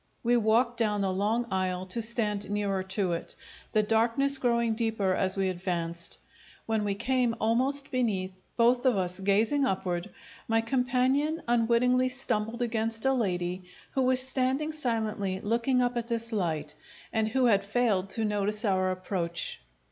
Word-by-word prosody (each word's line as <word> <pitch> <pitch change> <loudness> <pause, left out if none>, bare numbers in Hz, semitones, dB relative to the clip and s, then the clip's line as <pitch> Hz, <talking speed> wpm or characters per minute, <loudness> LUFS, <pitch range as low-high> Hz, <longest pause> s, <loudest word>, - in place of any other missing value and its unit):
We 240 +1 +3
walked 235 +2 +2
down 210 -3 +1
the 190 -1 0
long 215 +5 0
aisle 185 -1 -1
to 210 +5 -1
stand 215 -3 +1
nearer 200 -2 -1
to 190 0 -2
it, 170 - -4 0.4
the 215 -1 +2
darkness 230 +6 +2
growing 235 -2 +1
deeper 220 -4 0
as 190 +1 +1
we 195 -1 +1
advanced. 170 -2 -2 0.5
When 220 -1 -1
we 200 -1 -1
came 245 +1 0
almost 260 +5 +2
beneath, 190 -7 -1
both 245 +2 +3
of 245 -5 +3
us 180 0 -1
gazing 215 +9 +2
upward, 185 -4 -2 0.4
my 225 0 +2
companion 260 +6 0
unwittingly 240 +2 +2
stumbled 235 -2 -1
against 225 -1 -2
a 265 - +3
lady 180 -6 -2 0.3
who 265 - 0
was 255 0 +3
standing 265 +4 0
silently 220 -9 -1
looking 240 +5 +1
up 245 0 -1
at 235 -1 -3
this 230 -1 -2
light, 160 -8 -2 0.4
and 220 -1 +1
who 255 +3 +1
had 200 -4 +3
failed 205 -3 0
to 225 +2 0
notice 210 +1 0
our 185 -2 +1
approach. 185 -2 -2
220 Hz, 155 wpm, -28 LUFS, 195-245 Hz, 0.5 s, We